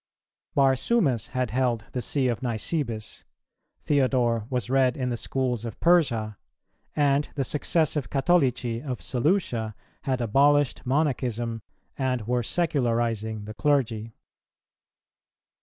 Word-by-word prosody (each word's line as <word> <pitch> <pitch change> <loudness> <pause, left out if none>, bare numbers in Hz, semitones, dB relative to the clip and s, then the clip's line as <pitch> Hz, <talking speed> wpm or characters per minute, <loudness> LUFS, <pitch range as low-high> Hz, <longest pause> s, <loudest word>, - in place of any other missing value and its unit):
Barsumas 135 - +2
had 125 -3 -2
held 120 -3 0
the 125 - -3
See 130 +3 +1
of 120 -2 -1
Nisibis, 115 -1 -3 0.6
Theodore 125 -5 +1
was 125 -5 -1
read 130 -1 +2
in 130 -2 -1
the 120 - -1
schools 125 -1 -2
of 115 -3 -7
Persia, 120 - +2 0.6
and 145 -1 +2
the 140 - 0
successive 150 +1 0
Catholici 130 -6 +1
of 130 -4 -5
Seleucia 125 - 0 0.3
had 130 -2 0
abolished 140 +4 +2
Monachism 120 -5 0 0.4
and 130 -4 -1
were 125 +1 +1
secularizing 115 -7 -1
the 110 - -7
clergy. 115 -5 0
125 Hz, 110 wpm, -26 LUFS, 115-140 Hz, 0.6 s, Barsumas